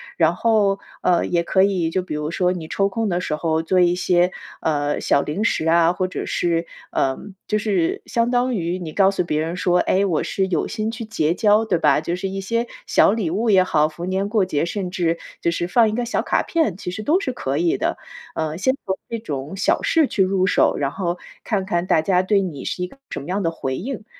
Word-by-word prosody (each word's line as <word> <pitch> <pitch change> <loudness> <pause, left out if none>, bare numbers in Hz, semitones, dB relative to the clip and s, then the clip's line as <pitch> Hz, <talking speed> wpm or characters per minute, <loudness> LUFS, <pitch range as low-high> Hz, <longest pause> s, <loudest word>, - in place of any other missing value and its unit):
然 165 0 +3
后， 205 -2 +2 0.2
呃， 175 -1 +2
也 170 -1 +1
可 190 +2 +3
以， 185 -4 +1
就 185 +3 0
比 180 - -6
如 150 0 -3
说 180 +1 +1
你 165 -3 -6
抽 195 +4 +1
空 225 +1 -1
的 175 -1 0
时 155 -4 -2
候 160 0 0
做 185 +3 +2
一 175 0 +4
些， 180 0 +2 0.3
呃， 145 -2 0
小 140 - +3
零 165 +8 -2
食 165 -7 +1
啊， 170 +1 +4
或 185 0 -1
者 185 - -5
是 170 -1 0 0.3
呃， 135 -1 0 0.3
就 215 - +1
是 200 -6 0
相 235 0 0
当 250 +1 +1
于 175 -2 -2
你 170 -4 -6
告 195 -1 +4
诉 195 -2 -1
别 155 -3 -1
人 165 +2 -3
说， 180 0 +2
哎， 195 +2 +2
我 170 -6 0
是 190 - -1
有 175 -4 0
心 220 0 -3
去 230 0 -6
结 165 -8 0
交 210 +3 +3
对 190 -5 +1
吧？ 150 -2 +3
就 170 - -2
是 190 +2 -3
一 195 +1 -4
些 230 +5 -1 0.2
小 - - +4
礼 215 -7 -1
物 220 +5 0
也 190 -2 +6
好， 155 -4 +2
逢 170 +3 -6
年 195 +2 -1
过 210 -3 +2
节， 150 -5 -1
甚 180 0 -4
至 170 -2 0 0.2
就 170 - +1
是 170 0 -1
放 225 +4 +4
一 215 - -3
个 245 +1 -1
小 235 - 0
卡 - - 0
片， 315 - 0
其 180 - -5
实 200 - -5
都 310 - +2
是 280 - -2
可 135 - -2
以 170 +1 +1
的。 - - -1 0.4
呃， 155 -1 -2
先 260 +7 +2
从 190 -1 -1
这 230 - -2
种 150 -6 -5
小 - - +1
事 325 -2 +3
去 200 - -1
入 190 0 +2
手， 185 - +3
然 140 -1 -1
后 175 0 -2 0.3
看 200 -4 -1
看 175 0 -1
大 - - +4
家 180 +1 +3
对 195 +2 +2
你 165 -8 -5
是 180 - -3
一 180 - -2
个 - - -17
什 - - -6 1.0
么 - - -20
185 Hz, 255 characters per minute, -21 LUFS, 165-205 Hz, 1.0 s, 也